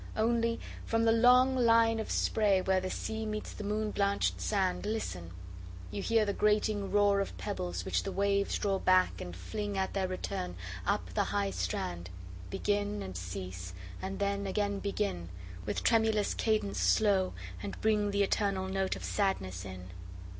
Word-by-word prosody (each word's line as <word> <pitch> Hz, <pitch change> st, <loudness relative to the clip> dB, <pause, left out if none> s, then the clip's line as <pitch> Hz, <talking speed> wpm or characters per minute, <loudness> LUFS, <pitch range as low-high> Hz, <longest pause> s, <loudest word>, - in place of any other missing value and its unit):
Only, 230 Hz, +1 st, +2 dB, 0.2 s
from 225 Hz, 0 st, +1 dB
the 225 Hz, -, +5 dB
long 250 Hz, +3 st, +6 dB
line 230 Hz, -2 st, +4 dB
of 220 Hz, -, -3 dB
sprayWhere 190 Hz, -3 st, +2 dB
the 185 Hz, -, -3 dB
sea 220 Hz, +3 st, -3 dB
meets 215 Hz, -1 st, -4 dB
the -, -, -7 dB
moon 210 Hz, +1 st, -1 dB
blanch'd 200 Hz, 0 st, +1 dB
sand, 190 Hz, -3 st, 0 dB
Listen! 95 Hz, -, -3 dB, 0.6 s
you 105 Hz, -, -3 dB
hear 225 Hz, -2 st, +3 dB
the 200 Hz, -, 0 dB
grating 210 Hz, -1 st, +1 dB
roarOf 200 Hz, -1 st, +2 dB
pebbles 185 Hz, -4 st, -3 dB
which -, -, +1 dB
the 195 Hz, -, -4 dB
waves 200 Hz, 0 st, +1 dB
draw 195 Hz, -2 st, 0 dB
back, 185 Hz, 0 st, +3 dB
and 90 Hz, -1 st, -6 dB
fling, 205 Hz, -, -4 dB
At 190 Hz, 0 st, -1 dB
their 190 Hz, -1 st, 0 dB
return, 90 Hz, -, -4 dB, 0.3 s
up -, -, 0 dB
the -, -, +1 dB
high 100 Hz, -1 st, 0 dB
strand, 90 Hz, -1 st, -3 dB, 0.4 s
Begin, 205 Hz, -, -1 dB
and 95 Hz, -1 st, -7 dB
cease, 90 Hz, 0 st, -6 dB, 0.3 s
and 190 Hz, +1 st, -4 dB
then 200 Hz, 0 st, -1 dB
again 200 Hz, +1 st, 0 dB
begin, 200 Hz, -, -2 dB, 0.4 s
With -, -, -2 dB
tremulous 220 Hz, -2 st, +3 dB
cadence 215 Hz, -, 0 dB
slow, 190 Hz, -, +3 dB, 0.3 s
and 100 Hz, -, -6 dB
bringThe 205 Hz, -2 st, +2 dB
eternal 195 Hz, -1 st, 0 dB
note 190 Hz, 0 st, 0 dB
of -, -, -8 dB
sadness 95 Hz, -, -1 dB
in. 95 Hz, -1 st, -8 dB
200 Hz, 155 wpm, -31 LUFS, 175-215 Hz, 0.6 s, long